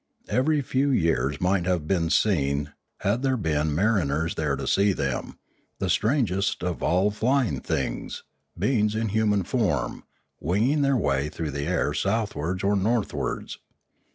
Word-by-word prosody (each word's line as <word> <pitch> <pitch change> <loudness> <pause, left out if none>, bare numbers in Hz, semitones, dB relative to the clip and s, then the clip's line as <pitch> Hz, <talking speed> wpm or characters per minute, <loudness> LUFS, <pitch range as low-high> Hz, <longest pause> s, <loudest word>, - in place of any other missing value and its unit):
Every 145 +3 +2
few 135 +2 +1
years 80 - +1
might 90 -1 +1
have 90 -5 0
been 85 -3 +1
seen, 70 -7 +1 0.3
had 105 +5 +1
there 135 -1 +1
been 75 -6 0
mariners 80 -5 +1
there 75 -4 -1
to 70 0 -5
see 100 +7 +3
them, - - -3 0.4
the - - -1
strangest 100 -7 +1
of 90 -1 -2
all 95 +4 +2
flying 115 - +1
things, - - -3 0.3
beings 105 -5 +1
in 110 0 -1
human 105 -1 +2
form, 105 0 -1 0.4
winging 115 - +1
their 140 -1 +3
way 70 - 0
through 80 -1 -4
the 70 +1 -3
air 85 -4 0
southwards 100 -3 -1
or 100 +1 +2
northwards. 100 - -1
95 Hz, 145 wpm, -25 LUFS, 80-110 Hz, 0.4 s, see